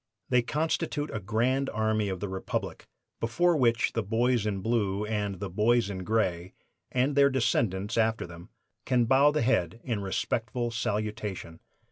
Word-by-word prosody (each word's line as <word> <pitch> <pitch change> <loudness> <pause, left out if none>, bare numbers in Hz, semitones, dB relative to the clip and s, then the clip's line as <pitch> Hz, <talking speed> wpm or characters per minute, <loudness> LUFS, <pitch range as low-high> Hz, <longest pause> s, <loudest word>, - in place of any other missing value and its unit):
They 125 -1 +4
constitute 150 +2 -1
"a 110 - -2
grand 120 +7 0
army 110 -1 0
of 95 -2 -4
the 100 - -2
Republic" 95 0 -4 0.3
before 170 +10 +2
which 115 -5 +2
the 115 - 0
boys 115 +1 +1
in 100 -2 -2
Blue 105 -2 0
and 105 -3 -2
the 100 - -3
boys 105 +3 +2
in 95 - -5
Gray, 90 -4 -1 0.4
and 130 +3 +1
their 140 0 +6
descendants 115 -5 0
after 110 -2 +1
them, 85 +3 -12 0.3
can 125 -2 +2
bow 135 +4 +5
the 150 -4 0
head 115 -6 +1
in 115 -5 -2
respectful 115 +5 -2
salutation. 105 -6 -3
110 Hz, 155 wpm, -28 LUFS, 100-125 Hz, 0.4 s, their